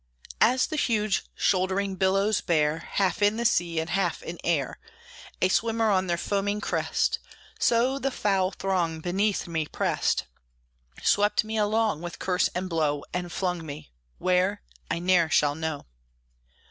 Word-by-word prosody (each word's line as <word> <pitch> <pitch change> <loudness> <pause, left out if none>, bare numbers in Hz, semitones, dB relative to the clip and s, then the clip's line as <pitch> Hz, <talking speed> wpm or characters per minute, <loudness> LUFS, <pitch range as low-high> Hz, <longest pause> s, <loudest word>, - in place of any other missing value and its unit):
As 250 +4 +4
the 310 - -4
huge 215 -7 +1
shouldering 190 +1 +1
billows 195 +2 +2
bear, 155 -1 +1
Half 195 0 +1
in 205 +2 +3
the 235 - -2
sea 170 -5 +2
and 160 +1 -3
half 180 -3 0
in 170 0 -7
air, 155 -6 0 0.6
A - - +6
swimmer 225 +1 +2
on 190 -1 +2
their 170 -1 0
foaming 205 +3 -1
crest, - - 0 0.4
So 250 +4 +2
the 275 - 0
foul 195 -7 +1
throng 180 -5 -1
beneath 195 +4 0
me 160 -2 -2
pressed, - - 0 0.8
Swept 205 +1 +3
me 220 +1 -5
along, 215 -4 +1
with 175 0 -6
curse 180 -1 +1
and 185 +1 -2
blow, 155 -4 0
And 180 -1 -3
flung 180 -2 -2
me 145 - -9 0.3
where, 185 +3 +1 0.3
I 165 - 0
ne'er 175 -1 +3
shall 145 -2 +3
know. 160 -1 -4
185 Hz, 150 wpm, -26 LUFS, 170-210 Hz, 0.8 s, A